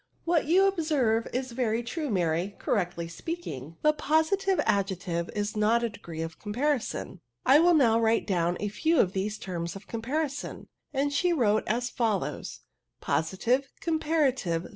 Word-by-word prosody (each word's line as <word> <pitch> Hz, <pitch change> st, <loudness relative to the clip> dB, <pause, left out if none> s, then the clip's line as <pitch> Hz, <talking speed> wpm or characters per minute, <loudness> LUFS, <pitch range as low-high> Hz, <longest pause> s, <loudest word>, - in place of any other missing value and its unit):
'* -, -, -42 dB
" -, -, -39 dB
What 330 Hz, -3 st, +3 dB
you 370 Hz, +4 st, +5 dB
observe 300 Hz, -, +1 dB
is 255 Hz, 0 st, -3 dB
very 235 Hz, -1 st, 0 dB
true, 300 Hz, +5 st, -3 dB
Maiy; 180 Hz, 0 st, 0 dB
correctly 175 Hz, -5 st, -1 dB
speaking, 165 Hz, -, -6 dB
the 305 Hz, 0 st, +5 dB
positive 320 Hz, +6 st, +1 dB
adjective 180 Hz, -3 st, -1 dB
is 205 Hz, +1 st, -2 dB
not 220 Hz, +3 st, +3 dB
a 235 Hz, -, +1 dB
degree 165 Hz, -6 st, -7 dB
of 165 Hz, 0 st, -7 dB
comparison." 240 Hz, -, -2 dB
" 120 Hz, +1 st, -49 dB
I 280 Hz, +3 st, +7 dB
will 345 Hz, +1 st, +5 dB
now 230 Hz, -6 st, +4 dB
write 225 Hz, 0 st, +2 dB
down 175 Hz, -3 st, 0 dB
a 205 Hz, -, -1 dB
few 320 Hz, +10 st, +1 dB
of 185 Hz, -, +3 dB
these 205 Hz, +2 st, -2 dB
terms 170 Hz, -3 st, -4 dB
of 195 Hz, 0 st, -10 dB
comparison 280 Hz, +5 st, -3 dB, 0.2 s
V'i 275 Hz, -, 0 dB
and 285 Hz, 0 st, 0 dB
she 350 Hz, +5 st, +2 dB
wrote 220 Hz, -8 st, +2 dB
as 240 Hz, +3 st, -1 dB
fol 220 Hz, -5 st, +1 dB
lows: -, -, -6 dB, 0.2 s
— -, -, -55 dB
Positive. 240 Hz, +11 st, +1 dB
Comparative. 285 Hz, -, 0 dB
230 Hz, 175 wpm, -28 LUFS, 185-295 Hz, 0.2 s, I